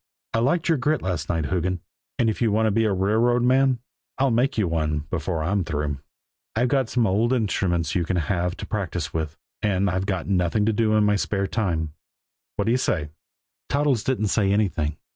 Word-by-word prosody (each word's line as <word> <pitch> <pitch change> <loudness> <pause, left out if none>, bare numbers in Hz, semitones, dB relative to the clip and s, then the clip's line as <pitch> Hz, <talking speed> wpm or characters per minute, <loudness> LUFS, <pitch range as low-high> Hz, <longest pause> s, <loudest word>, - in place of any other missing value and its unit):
"I 115 - +2
liked 145 +8 +1
your 165 -4 +2
grit 150 +3 0
last 90 -5 -2
night, 80 -3 0
Hoogan. 90 0 0 0.4
And 120 - +2
if 110 - -1
you 115 -3 +3
want 110 +2 +2
to 110 - +3
be 115 +2 +2
a 105 - +2
railroad 110 +6 +2
man, 130 +1 +4 0.4
I'll 135 -1 +2
make 120 +4 +1
you 105 -4 +2
one 75 -2 0
before 80 -2 -2
I'm 95 +4 +1
through. 75 -3 -2 0.6
I've 125 +3 +1
some 120 -2 +2
old 110 +5 +2
instruments 90 - 0
you 90 - +1
can 90 +2 -1
have 90 +1 -1
to - - -6
practice 90 -6 -3
with, 80 0 -3 0.2
and 100 -2 +1
I've 95 +2 -2 0.2
nothing 95 +2 +1
to 110 - +2
do 110 0 +2
in 105 - +4
my 105 0 +3
spare 100 0 -1
time. 85 -8 -1 0.6
What - - -1
do 115 - +2
you 125 - +3
say?" 75 -11 -1 0.6
Toddles 140 -5 +1
didn't 115 -6 0
say 100 -2 +2
anything. 85 -8 0
100 Hz, 200 wpm, -24 LUFS, 85-115 Hz, 0.6 s, man